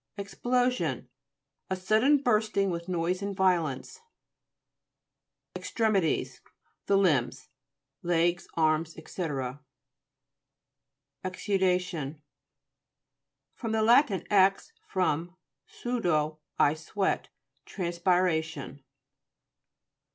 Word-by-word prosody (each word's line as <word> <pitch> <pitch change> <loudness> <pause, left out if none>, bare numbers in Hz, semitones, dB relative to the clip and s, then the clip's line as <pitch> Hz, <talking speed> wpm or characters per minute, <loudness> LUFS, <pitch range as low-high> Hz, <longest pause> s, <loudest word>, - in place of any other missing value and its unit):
EXPLOSION 220 - -1 0.6
A 190 - 0
sudden 215 +10 +3
bursting 210 -5 +2
with 170 +1 -5
noise 180 +1 -1
and 200 0 -3
violence. 180 - 0 1.5
EXTREMITIES 210 -7 0 0.5
The 200 - +4
limbs; 135 -8 +1 0.5
legs, 175 0 +1
arms, 160 0 +1
&c. - - -11 2.2
EXUDA'TIOST 180 -6 -1 1.4
fr. 235 - -4
lat. 220 0 +3
ex, 195 - +3
from, 175 -2 -1 0.3
sudo 165 -11 -1 0.2
y - - +5
I - - -1
sweat. 165 +5 -2 0.4
Transpiration. 170 -5 -1
185 Hz, 70 wpm, -28 LUFS, 160-205 Hz, 2.2 s, y